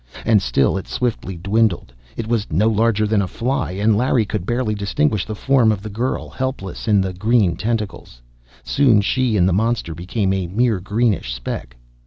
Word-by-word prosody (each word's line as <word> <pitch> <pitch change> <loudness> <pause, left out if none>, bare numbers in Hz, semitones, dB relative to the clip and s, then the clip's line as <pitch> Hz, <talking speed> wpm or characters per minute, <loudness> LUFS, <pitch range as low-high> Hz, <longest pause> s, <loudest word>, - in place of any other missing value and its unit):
And 110 -3 +4
still 70 0 +1
it - - -10
swiftly 110 -7 -3
dwindled. 100 - 0 0.2
It 115 - -3
was 115 -3 0
no 95 +8 +2
larger 110 -1 +2
than 105 -1 +2
a 95 - -1
fly, 130 -1 -2
and 105 +3 +2
Larry 120 0 +2
could 100 -3 -4
barely 120 -2 0
distinguish 100 -2 0
the 110 - -4
form 125 -1 +3
of 100 -2 -3
the 110 - -6
girl, 120 +6 -2
helpless 130 -9 -5
in 105 -3 +4
the 95 -1 -2
green 105 -2 +2
tentacles. 105 - -4 0.4
Soon 125 -7 +3
she 120 +1 +1
and 90 -1 +4
the 95 - +2
monster 110 -3 0
became 95 +4 -1
a 95 -2 -2
mere 110 +2 +1
greenish 105 - 0
speck.... - - -6
105 Hz, 185 wpm, -20 LUFS, 95-115 Hz, 0.4 s, And